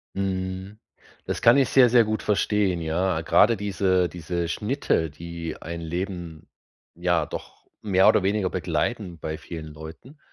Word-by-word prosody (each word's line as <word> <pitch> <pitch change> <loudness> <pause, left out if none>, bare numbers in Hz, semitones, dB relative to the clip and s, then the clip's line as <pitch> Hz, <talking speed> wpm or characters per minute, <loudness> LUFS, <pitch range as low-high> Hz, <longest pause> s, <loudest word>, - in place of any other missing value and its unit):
Mhm. 95 +1 -3 0.5
Das - - -3
kann 120 +2 +6
ich 135 -3 +3
sehr, 130 -2 +6
sehr 120 -1 +5
gut 110 0 -2
verstehen, 100 -4 +1
ja. 85 +1 0
Grade 105 +8 +4
diese 95 -2 +1
diese 85 0 -3
Schnitte, 105 - 0
die 85 +1 -7
ein 85 +1 -6
Leben, 85 -1 -5 0.5
ja, 85 -1 +1
doch - - -9
mehr 95 -2 +3
oder 105 - +4
weniger 100 -1 0
begleiten 100 -8 -2
bei 80 0 -5
vielen 80 -2 -8
Leuten, 80 - -11
95 Hz, 145 wpm, -25 LUFS, 85-105 Hz, 0.5 s, kann